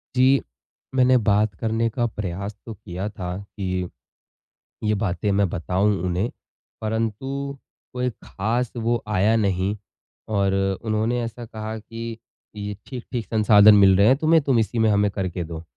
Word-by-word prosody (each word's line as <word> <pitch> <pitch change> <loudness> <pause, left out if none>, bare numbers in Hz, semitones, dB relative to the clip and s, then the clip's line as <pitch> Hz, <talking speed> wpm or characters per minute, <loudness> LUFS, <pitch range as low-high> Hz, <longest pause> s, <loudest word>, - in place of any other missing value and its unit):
जी। 130 +2 +5 0.5
मैंने 130 0 +5
बात 105 -2 +2
करने 115 +1 0
का 120 +1 -1
प्रयास 100 -1 -5
तो 115 - -6
किया 95 -1 -6
था 90 -3 -5
कि, 95 -2 -4 1.0
ये 105 0 +2
बातें 100 +1 0
मैं 100 0 +3
बताऊँ 95 +5 +1
उन्हें, 90 +5 0 0.5
परंतु 120 +6 -2 0.4
कोई 125 0 0
ख़ास 115 +4 -2
वो 115 0 0
आया 105 +1 +2
नहीं 100 -2 +1 0.6
और 100 -1 +2 0.3
उन्होंने 110 +2 0
ऐसा 115 +1 -6
कहा 110 0 -6
कि, 115 +1 -7 0.4
"ये 105 0 -5
ठीक-ठीक 120 -3 -5
संसाधन 105 -1 +6
मिल 100 -2 +6
रहे 100 +2 +5
हैं 130 - +6
तुम्हें, 160 +2 +4
तुम 135 -4 +2
इसी 115 +2 -1
में 110 -1 +4
हमें 105 0 +3
करके 95 -3 -3
दो।" 80 0 -7
110 Hz, 150 wpm, -23 LUFS, 100-115 Hz, 1.0 s, संसाधन